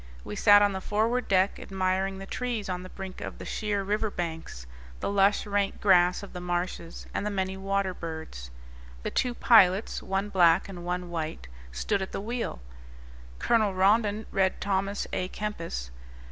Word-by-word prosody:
We 105 - -6
sat 205 - +7
on 205 -1 +2
the 190 - -4
forward 225 +6 0
deck, 190 0 +2
admiring 190 0 -1
the 195 - -7
trees 235 -2 -3
on 180 -1 -2
the 185 - -9
brink 190 -1 -8
of - - -6
the - - -8
sheer 210 -2 -1
river 210 +2 0
banks, 165 - -5 0.3
the - - -2
lush, 200 +1 +3
rank 200 -1 0
grass 180 -2 +4
of 200 - -10
the 180 - -6
marshes, 175 -1 -3
and - - -1
the 210 - -1
many 190 -2 -2
water 195 0 -1
birds. 160 - -7 0.5
The - - -2
two 250 -2 0
pilots, 200 -4 +4
one 195 +2 -2
black 175 -4 +4
and 180 -3 -8
one 180 0 -3
white, 155 - -4 0.2
stood 195 - -1
at 190 - -5
the - - -2
wheel. 230 - -4 0.8
Colonel 215 - +2
Rondon 210 +2 +3
read 190 -1 +1
Thomas 195 +1 -1
a 180 - -1
Kempis. 165 - -5
195 Hz, 175 wpm, -28 LUFS, 180-205 Hz, 0.8 s, sat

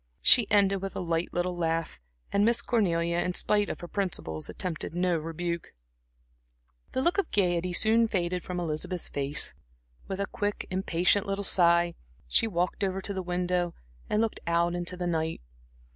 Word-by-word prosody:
She 240 -4 +6
ended 195 -2 +3
with 195 -1 -5
a - - -2
light 170 -1 -1
little 175 +1 -1
laugh, 165 -1 -1 0.3
and 200 - +3
Miss 235 +2 +3
Cornelia, 170 -7 +1
in 180 - 0
spite 205 +2 +1
of - - -5
her 175 - -6
principles, 170 - -3
attempted 170 -2 -4
no 180 0 +2
rebuke. 165 +1 -4 1.2
The 260 - 0
look 345 +5 +2
of 400 - -1
gaiety 180 -2 +1
soon 225 +5 +4
faded 180 -3 -1
from 180 -1 -4
Elizabeth's 170 +2 -3
face. 140 - -2 0.5
With 195 - -4
a 200 - +1
quick, 205 +1 -3
impatient 185 +2 +1
little 195 0 -2
sigh, 170 -2 +4 0.3
she 145 - +4
walked 180 -1 -1
over 190 -1 0
to 200 +1 -3
the 190 - -3
window, 180 -1 -1 0.3
and 210 - +2
looked 225 -1 -1
out 170 +1 +2
into 175 +1 -1
the 180 - -3
night. 160 -2 -1
180 Hz, 170 wpm, -28 LUFS, 170-195 Hz, 1.2 s, She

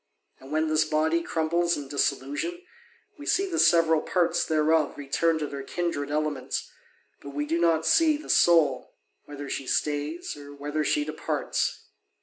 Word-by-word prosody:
And 135 +2 -13
when 155 +1 +1
this 155 0 +3
body 155 +2 +1
crumbles 170 +1 0
in 145 -2 -6
dissolution, 145 - -2 0.6
we 295 - -9
see 390 - +2
the 345 -3 -2
several 165 -2 +4
parts 175 -2 +1
thereof 155 -1 +1
return 160 +3 0
to 155 - -2
their 140 -1 -6
kindred 145 -1 -3
elements, 150 -2 -2 0.5
but 140 0 -10
we 145 0 -1
do 165 +3 -1
not 165 -2 +2
see 320 - +4
the 305 - -12
soul, 155 -7 +3 0.3
whether 145 -1 -8
she 135 -1 -4
stays 150 +3 -2
or 145 0 -11
whether 145 +2 -2
she 150 0 +1
departs. 155 - -2
155 Hz, 155 wpm, -26 LUFS, 145-170 Hz, 0.6 s, several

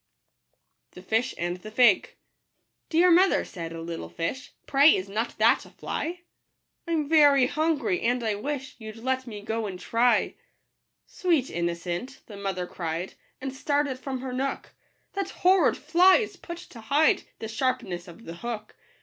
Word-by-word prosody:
iUm* 180 - -11
Digitized - - -27
by 220 - +4
Google 250 +3 -1
anb 175 +1 -3 0.2
tfie 235 -6 +6 0.9
$lg. - - -3
EAR 355 +2 +6
mother, 370 +3 +4
said 165 -3 -7
a 165 - -7
little 165 - -6
fish, 210 - -4
||||P - - -26
" - - -47
Pray 285 +3 +6
is 185 - -3
not 215 +4 -3
that - - +4
a - - -14
fly? 345 +2 -4 0.7
I'm 320 -3 0
very 290 -4 +6
hungry, 290 - 0
and 245 +1 +1
I 220 -2 +1
wish 265 +5 -4
You'd 225 +2 -9
i 260 - +4
e 260 - -12
t 260 - -11
me 210 -2 -7
go 220 +1 -2
and 185 -2 -6
try." 240 +4 +2 0.4
" - - -55 0.2
Sweet 330 -9 0
innocent," 170 +8 -3
the 210 - -11
mother 195 -2 -3
cried, 170 0 -4 0.3
And 265 0 -5
started 285 -1 -1
from 260 -1 -5
her 260 -1 -5
nook, 270 +2 -3 0.2
" - - -44
That 395 -1 -2
horrid 370 -5 +3
fly 350 +5 +5
is 420 -3 -1
put 340 -1 -8 0.2
to 230 - -10
hide 285 +8 +3 0.2
The 220 - -6
sharpness 225 -7 -2
of 175 +6 -13
the 165 +1 -8
hook." 220 0 -6
250 Hz, 185 wpm, -26 LUFS, 195-290 Hz, 0.9 s, tfie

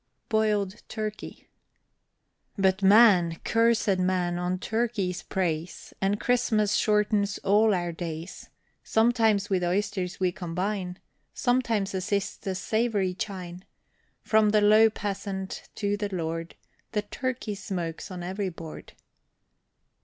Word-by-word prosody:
BOILED 210 -2 +1
TURKEY. 215 -1 -6 1.1
But 190 0 +2
man, 190 -5 +6
cursed 225 -4 +2
man, 180 -1 0
on 180 +1 -1
turkeys 220 -3 -1
preys, 170 -3 -3
And 200 +2 +1
Christmas 220 -4 +2
shortens 210 -2 +2
all 210 +3 +4
our 175 -1 -2
days. 165 0 -7 0.3
Sometimes 220 -3 +2
with 185 -2 +1
oysters 185 0 -1
we 185 -1 +2
combine, 180 +1 -3 0.4
Sometimes 230 -6 +1
assist 195 +1 -2
the 190 -1 -3
savory 210 -1 0
chine. 180 -2 -6 0.6
From 215 -1 +4
the 210 0 +3
low 215 +2 +6
peasant 195 -2 -5
to 205 -1 0
the 205 -1 -2
lord, 165 -2 -4 0.4
The 210 -1 0
turkey 250 0 -3
smokes 175 -5 -5
on 180 -2 -6
every 190 +2 -2
board. 165 -2 -10
200 Hz, 115 wpm, -27 LUFS, 180-215 Hz, 1.1 s, man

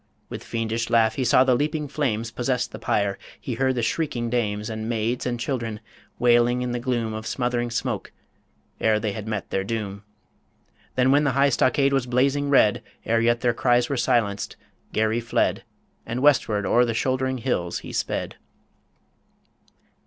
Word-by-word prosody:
With - - -7
fiendish 115 0 -2
laugh, 110 -1 +4
he 130 - -2
saw 125 +1 +5
the 130 -1 +3
leaping 150 +3 -1
flames 115 -6 -2
Possess 125 +1 -1
the - - -10
pyre; 100 -1 0 0.2
he 125 - -4
heard 130 +2 +1
the 120 - -1
shrieking 120 -3 -1
dames, 105 -3 -1
And 110 0 -4
maids 115 +2 -1
and 120 -1 -2
children, 115 -4 -3 0.4
wailing 120 +1 +3
in 125 - -2
the 120 - -2
gloom 120 -3 -1
Of 110 0 -5
smothering 120 -1 -1
smoke, 120 - -3 0.7
e'er 110 -1 +3
they 105 -1 -2
had 105 +1 -6
met 105 -3 -4
their 95 - 0
doom. 105 -1 -4 0.9
Then 130 +1 +3
when 145 +2 +4
the 140 -3 +1
high 140 +2 +4
stockade 140 +2 +2
was 135 -2 +1
blazing 140 +3 +1
red, 110 -7 +4 0.2
Ere 115 0 +2
yet 120 0 +2
their 120 -2 +2
cries 120 0 +2
were 140 - 0
silenced, 115 -6 0 0.4
Garry 110 +1 +1
fled, 115 - 0 0.4
And 120 +3 -4
westward 110 -8 +3
o'er 120 - +4
the 115 -2 -1
shouldering 130 +1 0
hills 110 -9 -1
he - - -8
sped. - - -2
120 Hz, 170 wpm, -24 LUFS, 110-130 Hz, 0.9 s, saw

